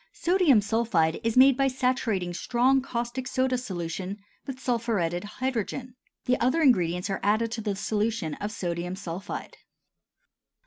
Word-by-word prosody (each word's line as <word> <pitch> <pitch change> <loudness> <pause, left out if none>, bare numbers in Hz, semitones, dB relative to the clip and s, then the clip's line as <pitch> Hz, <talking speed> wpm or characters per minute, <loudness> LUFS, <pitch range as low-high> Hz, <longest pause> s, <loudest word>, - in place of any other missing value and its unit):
Sodium 340 - +4
sulphide 205 -7 +1
is 230 +1 0
made 265 +1 +8
by 275 +1 +2
saturating 250 -8 0
strong 250 +8 +2
caustic 250 0 -4
soda 260 0 +1
solution 185 -4 -4 0.3
with 265 -1 -5
sulphuretted 220 -9 -1
hydrogen. 250 +2 -3 0.3
The 250 0 +2
other 265 +7 +2
ingredients 180 - +2
are 195 - -2
added 215 +3 +1
to 230 -1 -3
the 205 -2 -2
solution 210 -3 -1
of 205 +6 -4
sodium 175 -2 -3
sulphide. 190 0 -6
225 Hz, 135 wpm, -27 LUFS, 190-255 Hz, 0.3 s, made